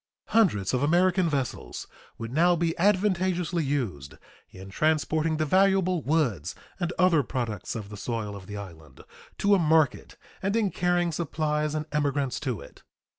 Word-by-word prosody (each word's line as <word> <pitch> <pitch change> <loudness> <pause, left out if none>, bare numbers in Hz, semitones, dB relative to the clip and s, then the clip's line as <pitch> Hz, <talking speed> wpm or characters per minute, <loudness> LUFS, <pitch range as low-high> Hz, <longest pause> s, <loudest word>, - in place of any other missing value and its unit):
Hundreds 140 - +2
of 125 - +1
American 175 +3 +3
vessels 135 -4 -3 0.3
would 115 +1 -6
now 175 +4 +4
be 165 -1 0
advantageously 185 -3 +1
used 115 - -3 0.3
in 95 +1 -11
transporting 155 +3 +1
the 155 - 0
valuable 185 0 +3
woods 130 - 0 0.2
and 175 -1 -1
other 180 -4 +4
products 115 -6 -4
of 105 -3 -6
the 105 - -8
soil 105 -1 -4
of 95 -2 -10
the 105 0 -6
island 80 -9 -11 0.4
to 205 0 +3
a 200 - +5
market 155 -4 +2 0.2
and 195 +2 0
in 215 -4 +1
carrying 175 0 +1
supplies 155 -1 -1
and 155 0 -2
emigrants 145 -3 0
to 130 -7 -3
it. - - -14
155 Hz, 155 wpm, -27 LUFS, 120-175 Hz, 0.4 s, a